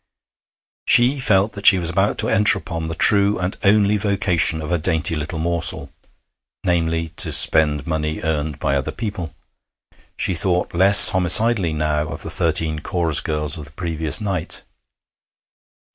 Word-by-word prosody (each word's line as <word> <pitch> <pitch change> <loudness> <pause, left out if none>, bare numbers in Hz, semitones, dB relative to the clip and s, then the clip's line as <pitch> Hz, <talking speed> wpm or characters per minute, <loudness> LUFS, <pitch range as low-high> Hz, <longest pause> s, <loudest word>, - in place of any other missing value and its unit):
She 125 +4 +3
felt 105 -3 +1
that 100 0 -3
she 95 - +6
was 85 -1 -2
about 95 +3 -1
to - - -3
enter 105 +1 +3
upon 80 -1 -7
the 80 - -2
true 100 +2 +2
and 90 +1 -4
only 105 +1 +2
vocation 95 -6 -1
of 80 +2 -7
a 85 - -1
dainty 80 0 -1
little 75 +1 -6
morsel 85 0 -1 0.7
namely, 80 -2 -2
to - - -1
spend 75 -3 +2
money 80 -1 -4
earned 75 -2 -3
by 70 - -2
other 70 -2 -3
people. 90 -9 -7 0.8
She - - -1
thought 90 0 -3
less 95 +4 +8
homicidally 95 -1 +3
now 75 0 -2
of 80 0 -6
the 80 - -8
thirteen 80 -1 -1
chorus 80 -2 -2
girls 75 +1 -4
of 75 - -9
the - - -15
previous 80 -3 -1
night. 95 -6 -5
85 Hz, 155 wpm, -18 LUFS, 80-95 Hz, 0.8 s, less